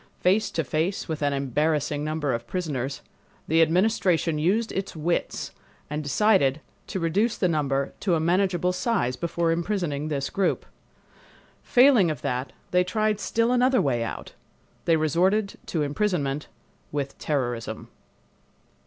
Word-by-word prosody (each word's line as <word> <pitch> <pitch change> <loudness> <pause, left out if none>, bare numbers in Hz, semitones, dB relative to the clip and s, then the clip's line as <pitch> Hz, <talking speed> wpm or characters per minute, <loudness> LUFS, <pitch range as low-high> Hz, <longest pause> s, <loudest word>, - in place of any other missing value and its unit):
Face 195 +4 +2
to 165 - -1
face 160 +7 -1
with 160 -3 -4
an 145 -1 +2
embarrassing 145 +2 0
number 155 -3 -1
of 115 0 -4
prisoners 140 -7 -3 0.4
the 165 +1 +4
Administration 170 -2 +2
used 210 +9 +1
its 195 -2 -4
wits 165 +2 -2 0.4
and 150 +1 -2
decided 150 -2 +3 0.3
to 190 - -3
reduce 200 +8 +1
the 185 - +2
number 140 -4 0
to 185 -4 +1
a - - +1
manageable 180 +1 +1
size 180 - 0
before 170 +2 -1
imprisoning 165 -4 -1
this 140 -3 -2
group. 195 -1 0 1.0
Failing 245 -8 +5
of 155 - -4
that 125 +1 -2 0.2
they 180 0 +4
tried 215 +3 0
still 230 +3 +1
another 250 +1 +3
way 130 -8 +1
out. - - -6 0.5
They 165 - +4
resorted 185 +7 +1
to 160 -3 -1
imprisonment 145 -3 -1 0.4
with 140 -2 -3
terrorism. 120 -6 -3
165 Hz, 135 wpm, -25 LUFS, 145-195 Hz, 1.0 s, Failing